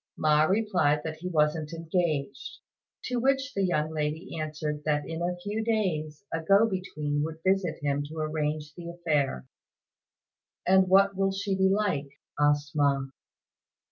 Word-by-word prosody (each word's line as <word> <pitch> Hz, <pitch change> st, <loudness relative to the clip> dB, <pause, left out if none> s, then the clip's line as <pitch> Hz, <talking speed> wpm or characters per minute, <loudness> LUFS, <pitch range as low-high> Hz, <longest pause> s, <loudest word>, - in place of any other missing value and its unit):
Ma 150 Hz, 0 st, +4 dB
replied 180 Hz, -7 st, +2 dB
that 160 Hz, -1 st, -5 dB
he 175 Hz, +3 st, -6 dB
wasn't 155 Hz, -1 st, +1 dB
engaged, 165 Hz, -1 st, -2 dB, 0.5 s
to 250 Hz, -, -2 dB
which 270 Hz, +2 st, +1 dB
the 200 Hz, -, 0 dB
young 155 Hz, -4 st, 0 dB
lady 155 Hz, +2 st, -3 dB
answered 150 Hz, -1 st, -3 dB
that 150 Hz, -1 st, 0 dB
in 165 Hz, +1 st, -4 dB
a 175 Hz, +1 st, -1 dB
few 210 Hz, +2 st, -2 dB
days 180 Hz, -9 st, -1 dB
a 165 Hz, -, -1 dB
go 200 Hz, +7 st, +5 dB
between 155 Hz, -7 st, -2 dB
would 160 Hz, +1 st, -3 dB
visit 190 Hz, -2 st, +1 dB
him 145 Hz, 0 st, 0 dB
to 160 Hz, +2 st, -9 dB
arrange 155 Hz, -1 st, -2 dB
the 170 Hz, +2 st, -8 dB
affair. 150 Hz, -, -1 dB, 1.2 s
"And 190 Hz, 0 st, +5 dB
what 195 Hz, +1 st, +5 dB
will 195 Hz, 0 st, +1 dB
she 195 Hz, 0 st, -2 dB
be 190 Hz, 0 st, +3 dB
like?" 190 Hz, -9 st, 0 dB, 0.3 s
asked 145 Hz, 0 st, +2 dB
Ma. 140 Hz, -2 st, +2 dB
160 Hz, 150 wpm, -28 LUFS, 150-190 Hz, 1.2 s, go